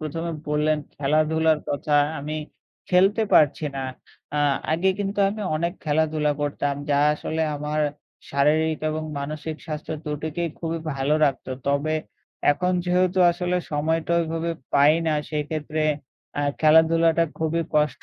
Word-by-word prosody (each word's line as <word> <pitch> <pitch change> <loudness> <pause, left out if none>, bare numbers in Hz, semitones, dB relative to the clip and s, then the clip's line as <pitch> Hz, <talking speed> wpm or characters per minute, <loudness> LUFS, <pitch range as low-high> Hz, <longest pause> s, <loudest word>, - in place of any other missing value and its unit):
প্রথমে 165 +2 -4 0.2
বললেন 150 +1 +2 0.2
খেলাধুলার 155 +2 +2
কথা 145 +1 -1 0.3
আমি 150 +2 -4 0.5
খেলতে 195 +5 +4
পারছি 150 +1 +4
না। 135 - -2 0.5
আ - - +1 0.3
আগে 170 +4 +2
কিন্তু 200 0 -3
আমি 210 +1 -5
অনেক 170 +2 -1
খেলাধুলা 155 -1 +1
করতাম 145 -1 -1 0.2
যা 140 - +3 0.2
আসলে 160 +1 -3
আমার 150 +1 -2 0.5
শারীরিক 155 +3 +2
এবং 155 0 -3 0.2
মানসিক 155 +2 -5
স্বাস্থ্য 155 -1 -5
দুটিকেই 160 +3 -3
খুবই 165 0 -3 0.2
ভালো 135 +2 +1
রাখতো। 135 -2 -1 0.2
তবে 140 +3 +1 0.6
এখন 180 +5 -1
যেহেতু 180 +1 +2
আসলে 180 +1 -1 0.2
সময়টা 160 +3 0
ওইভাবে 165 0 -2 0.2
পাই 145 +2 +6
না 155 - +2 0.2
সেক্ষেত্রে 155 0 -2 0.6
আ - - 0 0.2
খেলাধুলাটা 160 +1 +5
খুবই 160 +1 0
কষ্ট 150 -5 +1
155 Hz, 130 wpm, -24 LUFS, 150-165 Hz, 0.6 s, পাই